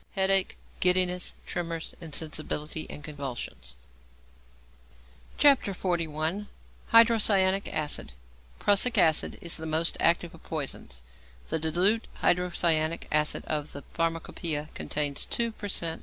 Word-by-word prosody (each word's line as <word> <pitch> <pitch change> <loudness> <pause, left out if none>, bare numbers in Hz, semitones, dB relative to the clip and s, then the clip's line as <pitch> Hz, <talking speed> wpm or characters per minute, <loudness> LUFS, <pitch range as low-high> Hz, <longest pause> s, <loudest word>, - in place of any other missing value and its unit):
Headache, 195 -1 +3 0.2
giddiness, 180 -1 +2
tremors, 165 -2 -4
insensibility, 155 0 -2
and 145 - -8
convulsions. 135 - -6 1.6
XLI. 180 - +1 0.4
HYDROCYANIC 210 -4 +5
ACID 145 - -2 0.4
=Prussic 215 +4 +3
Acid= 160 -5 +3
is 170 - +1
the 160 0 -4
most 160 +1 0
active 170 +1 +2
of 165 - -15
poisons. 135 - -5 0.5
The 160 - 0
diluted 180 +8 +1 0.2
hydrocyanic 170 -2 +2
acid 150 0 0
of 150 -1 -3
the 140 - -8
Pharmacopoeia 165 -2 -2
contains 145 -1 -2
2 235 -1 -1
per 210 -2 -7
cent. 165 -4 0
165 Hz, 105 wpm, -28 LUFS, 155-190 Hz, 1.6 s, HYDROCYANIC